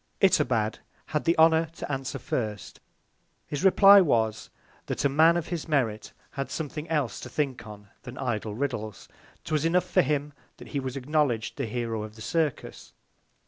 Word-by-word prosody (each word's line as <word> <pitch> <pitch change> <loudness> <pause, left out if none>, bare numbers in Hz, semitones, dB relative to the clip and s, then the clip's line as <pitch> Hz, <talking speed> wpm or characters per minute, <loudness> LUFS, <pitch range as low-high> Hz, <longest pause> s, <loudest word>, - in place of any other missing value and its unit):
Itobad 125 - +2 0.3
had 150 - -3
the 170 - +2
Honour 160 0 +5
to - - -6
answer 135 0 -3
first. 110 -5 -4 0.7
His 145 +2 -4
reply 195 +1 +8
was, 110 - 0 0.4
that - - -2
a - - +4
Man 160 +5 +5
of 170 - -4
his 170 -3 -4
Merit 125 -9 -1 0.2
had 135 0 -4
something 155 0 -5
else 150 -7 -1
to - - -8
think 135 -7 -3
on, 105 -1 -11
than 125 0 -10
idle 110 -4 -3
Riddles; 110 -6 -4 0.4
'twas 155 -1 -1
enough 175 +2 +2
for - - +3
him, 145 +1 -1 0.2
that - - -12
he 145 - -2
was 130 -1 -5
acknowledg'd 135 -4 0
the 135 -4 -3
Hero 115 -1 -3
of 110 0 -8
the 110 - -10
Circus. 155 -2 -3
140 Hz, 170 wpm, -27 LUFS, 115-155 Hz, 0.7 s, reply